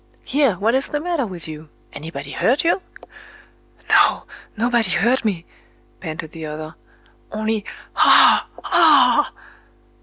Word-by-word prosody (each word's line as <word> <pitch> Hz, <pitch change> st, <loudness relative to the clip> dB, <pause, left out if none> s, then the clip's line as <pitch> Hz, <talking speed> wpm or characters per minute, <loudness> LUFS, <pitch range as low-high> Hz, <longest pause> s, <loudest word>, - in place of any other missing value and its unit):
"Here! 275 Hz, -6 st, +1 dB
what 215 Hz, +6 st, 0 dB
is 265 Hz, +1 st, 0 dB
the 295 Hz, -, -3 dB
matter 325 Hz, -6 st, -2 dB
with 175 Hz, -5 st, -9 dB
you? 155 Hz, 0 st, -10 dB, 0.2 s
Anybody 145 Hz, -2 st, -8 dB
hurt 265 Hz, -, 0 dB
you?" 340 Hz, +3 st, +1 dB, 1.1 s
"No—nobody 235 Hz, -2 st, 0 dB
hurt 230 Hz, +9 st, +1 dB
me," 185 Hz, -6 st, -2 dB, 0.5 s
panted 160 Hz, -2 st, -7 dB
the 165 Hz, -1 st, -9 dB
other,—"only... 210 Hz, +7 st, -7 dB, 0.4 s
_Ah!—aa! 295 Hz, -5 st, +4 dB
220 Hz, 100 wpm, -20 LUFS, 165-265 Hz, 1.1 s, Ah!—aa